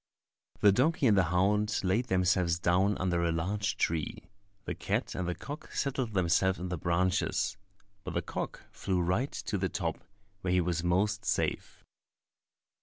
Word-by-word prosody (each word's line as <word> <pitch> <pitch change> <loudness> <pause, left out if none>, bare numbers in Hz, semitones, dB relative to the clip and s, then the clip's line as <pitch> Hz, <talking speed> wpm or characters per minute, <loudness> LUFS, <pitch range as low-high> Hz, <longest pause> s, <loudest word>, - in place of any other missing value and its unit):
The 105 - +7
donkey 145 - +2
and 110 -4 +5
the 95 -3 +4
hound 100 +5 +2
laid 100 +7 +1
themselves 90 -3 +2
down 90 +4 +2
under 90 -2 0
a 85 - +2
large 100 +6 -1
tree, 80 +3 -2 0.3
the - - -2
cat - - -2
and 90 -1 -3
the 90 - -1
cock 145 +2 -8
settled 130 -5 -1
themselves 95 +1 +2
in 90 +1 -5
the 90 - -2
branches; 90 +2 +1 0.5
but - - -6
the - - 0
cock - - -5
flew 95 -2 -1
right 90 +11 0
to 100 - -3
the 95 0 0
top, 85 -5 -2 0.4
where 90 -2 0
he 90 - +4
was 85 -1 0
most 100 +4 +1
safe. - - -2
95 Hz, 165 wpm, -30 LUFS, 85-105 Hz, 0.5 s, The